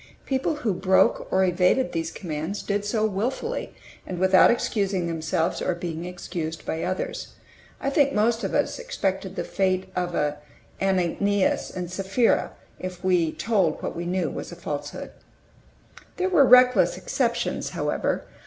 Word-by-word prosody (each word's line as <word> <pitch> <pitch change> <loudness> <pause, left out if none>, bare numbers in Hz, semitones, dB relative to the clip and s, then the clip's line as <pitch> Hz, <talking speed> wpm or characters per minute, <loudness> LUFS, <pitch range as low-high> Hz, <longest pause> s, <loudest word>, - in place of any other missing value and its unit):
People 270 +4 0
who 240 -9 -1
broke 190 +1 +3
or 190 - +3
evaded 180 +8 +2
these 165 -1 -2
commands 165 +3 -4
did 205 0 -1
so 215 +1 0
willfully, 250 - -2 0.3
and 185 - -6
without 185 +1 +6
excusing 200 -6 0
themselves, 165 +1 -1
or 180 - 0
being 170 -1 -5
excused 175 -2 -5
by 160 - -2
others. 185 +1 -4 0.4
I 275 - -1
think 280 -1 +3
most 225 +1 +1
of - - -2
us - - 0
expected - - -2
the - - -2
fate 185 -1 -1
of 175 -1 -1 0.7
Ananias 195 +1 +1
and 180 -1 -5
Sapphira, 195 +5 +1 0.3
if 185 -1 -6
we 180 -4 +2
told 195 -8 0
what - - -3
we 170 +1 -4
knew 185 +1 0
was - - -6
a - - -7
falsehood. - - -5 1.1
There 370 0 +1
were 310 -7 +6
reckless 250 - +6
exceptions, - - -1
however. - - -1
190 Hz, 145 wpm, -25 LUFS, 175-225 Hz, 1.1 s, without